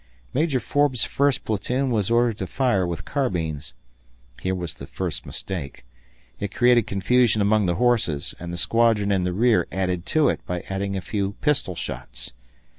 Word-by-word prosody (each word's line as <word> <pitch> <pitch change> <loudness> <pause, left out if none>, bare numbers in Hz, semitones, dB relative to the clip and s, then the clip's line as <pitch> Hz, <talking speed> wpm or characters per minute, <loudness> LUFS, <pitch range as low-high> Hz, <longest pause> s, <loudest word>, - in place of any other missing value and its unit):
Major 145 -1 +1
Forbes' 145 -2 +1
first 140 -2 +1
platoon 125 +5 0
was 105 -4 +1
ordered 115 -2 +2
to 95 - -3
fire 110 -6 +1
with 85 -1 -4
carbines. 85 - -2 0.7
Here 95 0 0
was 85 -4 -4
the - - -10
first - - -4
mistake. 80 -10 -6 0.5
It 100 - -3
created 120 -3 +4
confusion 110 +3 +3
among 105 -1 +3
the 85 - +1
horses, 115 -11 +1
and 85 0 -6
the 85 - -4
squadron 110 0 +2
in 95 -2 +1
the 90 - 0
rear 110 -1 +3
added 90 -1 -2
to 155 -2 +3
it - - -2
by 90 -1 -2
firing 100 0 -3
a - - -3
few 100 0 -2
pistol 135 - 0
shots. - - -6
100 Hz, 170 wpm, -24 LUFS, 90-120 Hz, 0.7 s, created